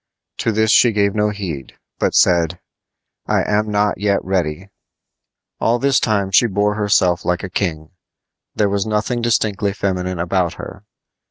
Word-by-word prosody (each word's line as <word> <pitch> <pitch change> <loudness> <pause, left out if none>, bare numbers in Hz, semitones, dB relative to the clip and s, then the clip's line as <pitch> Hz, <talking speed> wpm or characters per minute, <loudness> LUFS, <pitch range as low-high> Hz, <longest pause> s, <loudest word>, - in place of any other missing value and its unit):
To 115 - 0
this 110 0 +2
she 120 -2 +5
gave 100 -1 +1
no 105 0 +1
heed, 90 -11 -6 0.3
but - - 0
said: 85 0 +3 0.7
"I - - +1
am 105 +1 0
not 105 0 0
yet 100 -1 +1
ready." 90 -1 -2 0.9
All 115 +1 +2
this 135 +1 +2
time 100 -3 0
she 120 +5 +5
bore 105 0 0
herself 95 -4 +1
like 90 +1 -1
a 95 - -6
king. 80 -5 -3 0.6
There 105 - +2
was 100 +1 -1
nothing 110 +3 -1
distinctly 105 -4 0
feminine 90 -2 -2
about 85 0 0
her. - - -10
100 Hz, 155 wpm, -18 LUFS, 90-105 Hz, 0.9 s, she